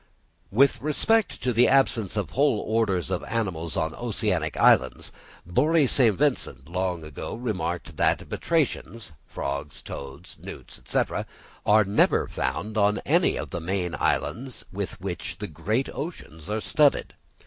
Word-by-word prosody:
_ -, -, -34 dB, 0.5 s
With 135 Hz, +7 st, +3 dB
respect 210 Hz, -, +1 dB
to 125 Hz, -, +1 dB
the 120 Hz, +2 st, +5 dB
absence 115 Hz, -7 st, +2 dB
of 105 Hz, -, -2 dB
whole 140 Hz, -5 st, +2 dB
orders 105 Hz, -, 0 dB
of -, -, -1 dB
animals 90 Hz, -, -2 dB
on -, -, 0 dB
oceanic -, -, -1 dB
islands, -, -, +3 dB, 0.3 s
Bory 150 Hz, -, +3 dB
St. 120 Hz, -5 st, +4 dB
Vincent 125 Hz, -, 0 dB
long 90 Hz, -1 st, -2 dB
ago 75 Hz, +6 st, -6 dB
remarked 90 Hz, -8 st, -3 dB
that -, -, +2 dB
Batrachians 120 Hz, -, -1 dB, 0.2 s
(frogs, 70 Hz, +1 st, -5 dB
toads, 70 Hz, -1 st, -8 dB
newts) -, -, -9 dB, 0.9 s
are 110 Hz, +1 st, +6 dB
never 100 Hz, +2 st, +3 dB
found 105 Hz, +12 st, -2 dB
on 105 Hz, 0 st, +3 dB
any -, -, +3 dB
of -, -, -5 dB
the 85 Hz, -, -4 dB
many 90 Hz, 0 st, -2 dB
islands 130 Hz, +1 st, -1 dB
with 100 Hz, 0 st, -4 dB
which 90 Hz, -2 st, -5 dB
the -, -, -5 dB
great 115 Hz, +7 st, -1 dB
oceans 100 Hz, -, -7 dB
are 110 Hz, +1 st, -1 dB
studded. 145 Hz, +3 st, +3 dB
105 Hz, 140 wpm, -26 LUFS, 85-130 Hz, 0.9 s, are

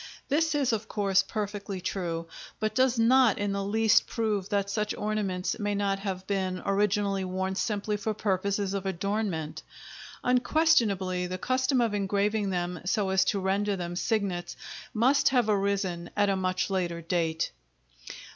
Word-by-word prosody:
This 315 Hz, +2 st, +2 dB
is, 275 Hz, -5 st, +2 dB
of 220 Hz, 0 st, -2 dB
course, 195 Hz, -3 st, +2 dB
perfectly 205 Hz, -1 st, -4 dB
true, 170 Hz, -3 st, -3 dB, 0.3 s
but 215 Hz, 0 st, -1 dB
does 255 Hz, +1 st, +3 dB
not 235 Hz, -1 st, +5 dB
in 205 Hz, -1 st, -1 dB
the 200 Hz, 0 st, -1 dB
least 220 Hz, +2 st, +3 dB
prove 210 Hz, -5 st, -1 dB
that 200 Hz, -1 st, 0 dB
such 210 Hz, +1 st, -1 dB
ornaments 205 Hz, -2 st, -2 dB
may 205 Hz, -1 st, -1 dB
not 200 Hz, -1 st, 0 dB
have 190 Hz, -2 st, -4 dB
been 190 Hz, -2 st, -1 dB
originally 200 Hz, -1 st, +1 dB
worn 190 Hz, +1 st, -2 dB
simply 210 Hz, +1 st, -1 dB
for 215 Hz, +1 st, -2 dB
purposes 200 Hz, -1 st, 0 dB
of 195 Hz, -1 st, -2 dB
adornment; 190 Hz, -4 st, -2 dB, 0.6 s
unquestionably, 235 Hz, -, +2 dB
the 185 Hz, +1 st, -4 dB
custom 255 Hz, +4 st, +1 dB
of 230 Hz, -3 st, +1 dB
engraving 205 Hz, +1 st, 0 dB
them 180 Hz, -1 st, -2 dB
so 195 Hz, +2 st, 0 dB
as 190 Hz, 0 st, +4 dB
to 200 Hz, -, +1 dB
render 200 Hz, +2 st, 0 dB
them 175 Hz, -1 st, -4 dB
signets 185 Hz, -4 st, -1 dB, 0.3 s
must 255 Hz, +6 st, +3 dB
have 250 Hz, -4 st, +2 dB
arisen 195 Hz, -4 st, 0 dB
at 205 Hz, -1 st, +3 dB
a 195 Hz, -, +2 dB
much 185 Hz, 0 st, -1 dB
later 175 Hz, -3 st, -1 dB
date. 165 Hz, -1 st, -1 dB
200 Hz, 155 wpm, -28 LUFS, 185-215 Hz, 0.6 s, not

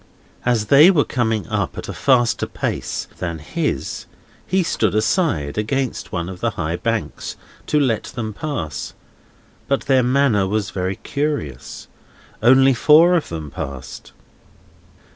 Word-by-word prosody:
As 115 Hz, -3 st, +2 dB
they 140 Hz, -, +7 dB
were 165 Hz, -7 st, +4 dB
coming 110 Hz, -6 st, -1 dB
up -, -, -2 dB
at -, -, -6 dB
a -, -, -5 dB
faster 120 Hz, -3 st, +2 dB
pace -, -, -3 dB
than 85 Hz, -2 st, -3 dB
his, 75 Hz, -2 st, -3 dB, 0.4 s
he 185 Hz, +1 st, +2 dB
stood 110 Hz, -, 0 dB
aside, 110 Hz, -, 0 dB
against 130 Hz, +4 st, -2 dB
one 85 Hz, -1 st, -3 dB
of 95 Hz, -1 st, -8 dB
the -, -, 0 dB
high 85 Hz, 0 st, -2 dB
banks, 115 Hz, +4 st, -3 dB, 0.3 s
to 150 Hz, -, +2 dB
let 125 Hz, -6 st, +1 dB
them 110 Hz, -5 st, -5 dB
pass. 100 Hz, -, -5 dB, 0.7 s
But 140 Hz, -, +1 dB
their 135 Hz, -2 st, +3 dB
manner 125 Hz, -6 st, +2 dB
was 105 Hz, 0 st, -1 dB
very 95 Hz, +1 st, -2 dB
curious. 140 Hz, -, -4 dB, 0.5 s
Only 130 Hz, +3 st, +6 dB
four 155 Hz, +8 st, +6 dB
of 170 Hz, -4 st, 0 dB
them 80 Hz, -3 st, -6 dB
passed. 70 Hz, -2 st, -7 dB
115 Hz, 140 wpm, -20 LUFS, 90-140 Hz, 0.7 s, they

